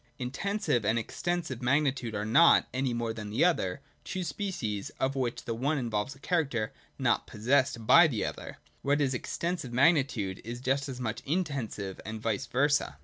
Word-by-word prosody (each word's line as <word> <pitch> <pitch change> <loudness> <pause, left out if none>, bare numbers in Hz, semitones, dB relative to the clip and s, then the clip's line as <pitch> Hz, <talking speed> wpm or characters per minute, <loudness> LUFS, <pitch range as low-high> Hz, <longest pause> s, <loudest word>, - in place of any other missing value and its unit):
Intensive 135 - -1
and 110 +3 +2
Extensive 160 +2 -3
magnitude 135 -3 +1
are 105 0 -2
not, 140 +10 +6
any 130 0 0
more 120 -1 -2
than 105 -2 -6
the 110 +10 +3
other, 140 - +1 0.2
two 185 -1 -4
species, 140 - -3
of 135 +1 0
which 125 -3 -2
the 115 - -2
one 140 +7 0
involves 120 +1 -2
a - - -18
character 140 -10 -1 0.2
not - - +1
possessed 120 +1 +1
by 170 +9 +8
the 120 -8 -1
other: - - -6 0.2
what 145 +1 +2
is 135 -2 +1
Extensive 170 +2 -3
magnitude 130 - +2
is 120 +2 -6
just 135 +3 0
as 130 -2 -6
much 110 -3 -3
Intensive, 135 - -3
and 110 0 -6
vice 110 -2 -2
versa. 145 +3 +1
130 Hz, 170 wpm, -29 LUFS, 115-145 Hz, 0.2 s, by